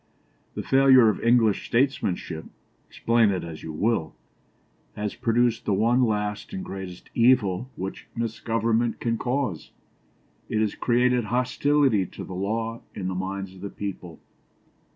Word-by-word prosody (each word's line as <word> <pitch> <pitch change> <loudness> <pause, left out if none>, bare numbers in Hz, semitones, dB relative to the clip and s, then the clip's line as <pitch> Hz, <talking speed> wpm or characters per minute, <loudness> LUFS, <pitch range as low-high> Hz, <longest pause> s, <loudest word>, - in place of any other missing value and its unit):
The - - -3
failure 135 -3 +6
of 105 - -1
English 115 -3 +3
statesmanship, 100 - 0 0.4
explain 115 -2 +2
it 95 -2 -1
as 80 -2 -8
you 80 - -6
will, 100 +1 -1 0.8
has 105 0 -3
produced 115 0 +1
the 100 - +1
one 120 +5 +3
last 105 - -2
and 190 -1 -5
greatest 95 -2 -8
evil 120 -2 +3
which 95 +1 -6
misgovernment 115 0 -1
can 115 -1 -1
cause. 125 - -2 0.8
It 110 - 0
has 110 -1 +1
created 125 0 +2
hostility 125 -2 +2
to - - -9
the - - -8
law 110 +5 -2
in 95 -2 -3
the - - -2
minds 95 +1 -4
of 95 - -14
the 100 - -5
people. 95 -5 -7
110 Hz, 140 wpm, -25 LUFS, 95-120 Hz, 0.8 s, failure